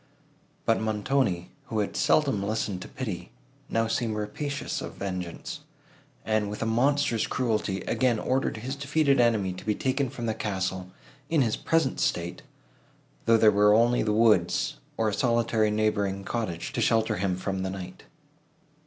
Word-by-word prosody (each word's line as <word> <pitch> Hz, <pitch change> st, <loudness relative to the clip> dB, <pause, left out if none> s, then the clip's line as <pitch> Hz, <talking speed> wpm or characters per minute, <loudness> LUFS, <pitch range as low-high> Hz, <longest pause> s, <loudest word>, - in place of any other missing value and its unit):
But 115 Hz, -, +2 dB
Montoni, 110 Hz, -4 st, 0 dB
who 110 Hz, -, -4 dB
had 105 Hz, -2 st, -1 dB
seldom 135 Hz, -9 st, +2 dB
listened 100 Hz, -2 st, -2 dB
to -, -, -7 dB
pity, 110 Hz, -10 st, -5 dB, 0.4 s
now 115 Hz, 0 st, +1 dB
seemed 115 Hz, 0 st, -1 dB
rapacious 140 Hz, +7 st, -3 dB
of -, -, -7 dB
vengeance, 90 Hz, -3 st, -5 dB, 0.7 s
and, 110 Hz, -1 st, +1 dB
with 105 Hz, +2 st, -4 dB
a -, -, -1 dB
monster's 120 Hz, +1 st, +2 dB
cruelty, 110 Hz, -6 st, -1 dB
again 125 Hz, -3 st, +1 dB
ordered 130 Hz, +2 st, 0 dB
his 130 Hz, +5 st, -4 dB
defeated 140 Hz, 0 st, +2 dB
enemy 110 Hz, -6 st, +2 dB
to 90 Hz, -, -9 dB
be 105 Hz, -1 st, 0 dB
taken 135 Hz, +2 st, 0 dB
from 120 Hz, -1 st, -6 dB
the 110 Hz, -, 0 dB
castle, 95 Hz, -3 st, -3 dB, 0.4 s
in 160 Hz, -4 st, +3 dB
his 115 Hz, -3 st, 0 dB
present 165 Hz, -5 st, 0 dB
state, 85 Hz, 0 st, -1 dB, 0.8 s
though 115 Hz, 0 st, +5 dB
there 110 Hz, -1 st, +6 dB
were 105 Hz, +1 st, +5 dB
only 120 Hz, +2 st, +4 dB
the 105 Hz, -, +1 dB
woods, 105 Hz, -, +3 dB, 0.2 s
or 115 Hz, -, +1 dB
a 105 Hz, -, 0 dB
solitary 115 Hz, -2 st, +2 dB
neighbouring 105 Hz, -2 st, 0 dB
cottage, 95 Hz, -7 st, -3 dB
to -, -, -1 dB
shelter 110 Hz, -3 st, +2 dB
him 95 Hz, -1 st, 0 dB
from 95 Hz, 0 st, -3 dB
the 95 Hz, -, -2 dB
night. 95 Hz, -1 st, -8 dB
110 Hz, 160 wpm, -27 LUFS, 100-120 Hz, 0.8 s, there